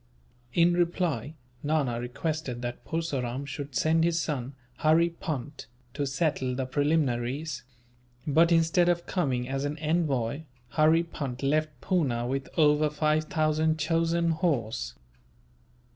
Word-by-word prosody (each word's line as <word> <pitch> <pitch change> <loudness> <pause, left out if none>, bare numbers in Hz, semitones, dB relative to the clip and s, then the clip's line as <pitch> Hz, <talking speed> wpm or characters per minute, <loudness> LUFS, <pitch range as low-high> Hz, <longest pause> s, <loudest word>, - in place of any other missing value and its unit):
In 175 +1 +5
reply, 170 - 0 0.3
Nana 145 -6 0
requested 125 0 -3
that 120 0 -5
Purseram 140 -5 -2
should 140 -1 -6
send 160 +3 +3
his 170 0 +2
son, 135 -5 -3 0.2
Hurry 165 +2 +4
Punt, 150 -4 -5 0.3
to 140 0 -2
settle 135 -3 0
the 130 0 -2
preliminaries; 140 -1 0 0.6
but 165 +3 +4
instead 165 +1 +4
of 170 -1 0
coming 130 -9 -1
as 135 +1 -2
an 145 +1 -2
envoy, 150 -5 0 0.3
Hurry 160 +4 +4
Punt 140 -6 -5
left 150 -1 0
Poona 140 -11 0
with 135 +1 -3
over 150 -1 +4
five 155 +1 +1
thousand 155 -2 +1
chosen 165 +2 +1
horse. 120 - -1
150 Hz, 125 wpm, -28 LUFS, 130-165 Hz, 0.6 s, In